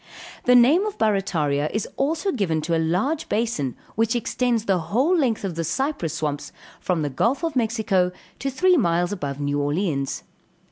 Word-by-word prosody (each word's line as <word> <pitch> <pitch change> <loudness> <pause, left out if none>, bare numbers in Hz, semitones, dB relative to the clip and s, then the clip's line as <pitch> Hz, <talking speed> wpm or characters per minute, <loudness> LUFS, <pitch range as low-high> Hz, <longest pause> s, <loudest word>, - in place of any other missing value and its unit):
The 250 - +6
name 270 +10 +6
of 420 - -5
Barrataria 160 -9 +1
is 215 - -2
also 320 +8 0
given 185 - 0
to 165 +2 0
a 165 - +1
large 200 - 0
basin 210 - -1 0.2
which 225 +1 +1
extends 240 -1 0
the 195 -4 +2
whole 245 - +1
length 255 -11 +1
of 190 -3 -2
the 165 0 -3
cypress 175 - -2
swamps, 150 -2 -3 0.3
from 175 -4 -1
the 145 - -1
Gulf 240 - 0
of 325 -3 -1
Mexico 220 -6 +1 0.3
to 275 - -2
three 360 +7 +3
miles 175 - +1
above 145 -8 -4
New 145 0 -1
Orleans. 145 -2 -1
200 Hz, 175 wpm, -23 LUFS, 160-250 Hz, 0.3 s, The